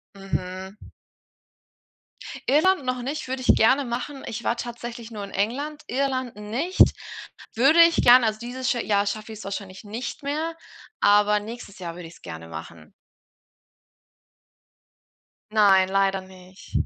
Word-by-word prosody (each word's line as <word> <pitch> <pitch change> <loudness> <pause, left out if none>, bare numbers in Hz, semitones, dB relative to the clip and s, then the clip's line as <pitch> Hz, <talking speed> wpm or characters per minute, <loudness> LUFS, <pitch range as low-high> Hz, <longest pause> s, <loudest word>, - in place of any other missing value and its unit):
Mhm. 190 0 -5 1.7
Irland 310 +2 +3
noch 255 -1 -1
nicht, 285 +2 -4
würde 260 0 -3
ich 250 - +5
gerne 260 +5 +4
machen. 250 +4 -5
Ich 230 +1 -5
war 235 - +1
tatsächlich 240 -1 -7
nur 210 -3 -7
in 195 - -8
England, 285 +9 -2
Irland 260 -2 -1
nicht. 240 - -4 0.8
Würde 275 +8 +5
ich 335 0 +5
gern, 245 0 +8
also 215 -1 +1
dieses 250 +2 -3
scha 240 - +1
Jahr 200 -1 +1
schaff 215 +2 -4
ich's 220 -1 -8
wahrscheinlich 195 0 -6
nicht 230 +8 -6
mehr, 310 +4 -2 0.4
aber 210 +1 +4
nächstes 215 -2 -9
Jahr 170 -2 -6
würde 175 -2 -8
ich's 165 - -16
gerne 80 0 -8
machen. 80 -1 -10 2.6
Nein, 195 -3 +5
leider 195 0 +1
nicht. 185 0 -15
225 Hz, 135 wpm, -24 LUFS, 195-255 Hz, 2.6 s, gern